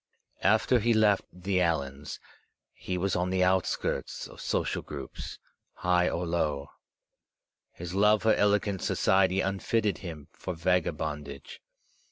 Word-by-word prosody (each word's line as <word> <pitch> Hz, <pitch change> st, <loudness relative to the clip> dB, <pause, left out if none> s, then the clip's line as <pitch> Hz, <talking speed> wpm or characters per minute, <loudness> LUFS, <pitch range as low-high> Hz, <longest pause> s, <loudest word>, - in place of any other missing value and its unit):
After 110 Hz, +5 st, +4 dB
he 115 Hz, +1 st, +2 dB
left 105 Hz, -2 st, +4 dB
the 90 Hz, +1 st, -1 dB
Allans, 70 Hz, -5 st, -1 dB, 0.6 s
he 90 Hz, -, -4 dB
was 95 Hz, +1 st, 0 dB
on 90 Hz, +1 st, 0 dB
the 95 Hz, 0 st, +2 dB
outskirts 95 Hz, 0 st, 0 dB
of -, -, -12 dB
social -, -, -1 dB
groups, -, -, -7 dB, 0.4 s
high 90 Hz, 0 st, +2 dB
or 85 Hz, +1 st, -2 dB
low. 75 Hz, -4 st, -1 dB, 1.0 s
His 85 Hz, +1 st, -7 dB
love 105 Hz, +2 st, +4 dB
for 110 Hz, -1 st, +5 dB
elegant 100 Hz, -1 st, +2 dB
society 95 Hz, 0 st, +3 dB
unfitted 100 Hz, +2 st, 0 dB
him 80 Hz, -6 st, -8 dB
for 90 Hz, -, -5 dB
vagabondage. 80 Hz, -5 st, -2 dB
90 Hz, 125 wpm, -29 LUFS, 85-100 Hz, 1.0 s, for